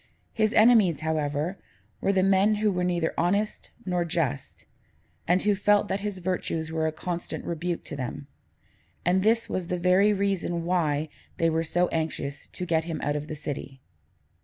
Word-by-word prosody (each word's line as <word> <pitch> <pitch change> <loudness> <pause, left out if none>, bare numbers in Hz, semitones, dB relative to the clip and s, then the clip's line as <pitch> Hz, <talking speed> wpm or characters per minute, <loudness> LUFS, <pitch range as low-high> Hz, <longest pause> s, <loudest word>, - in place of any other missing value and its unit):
His 215 -1 +2
enemies, 215 - +5
however, 155 +3 -1 0.4
were 195 - +2
the 190 -1 +2
men 195 +2 +4
who 210 0 +1
were 180 -1 -1
neither 175 -2 0
honest 200 +5 0 0.2
nor 180 -2 0
just, 155 -5 -3 0.6
and 180 +2 +3
who 205 0 +3
felt 205 +1 +3
that 195 - 0
his 205 -1 -4
virtues 170 -3 -2
were 160 0 0
a - - 0
constant 175 +2 -5
rebuke 170 +1 -3
to - - -7
them; 135 +1 -5 0.8
and 180 +2 +3
this 225 +3 +2
was 180 -2 -3
the 180 - -1
very 185 +4 +4
reason 195 -4 -1
why 155 -4 +1 0.3
they 165 0 +2
were 160 +1 +1
so 175 +2 +1
anxious 150 -3 -3
to 180 - -6
get 165 -2 +1
him 165 -2 -4
out 145 - 0
of 150 0 -3
the 155 - -5
city. 145 -2 -6
175 Hz, 175 wpm, -27 LUFS, 160-195 Hz, 0.8 s, enemies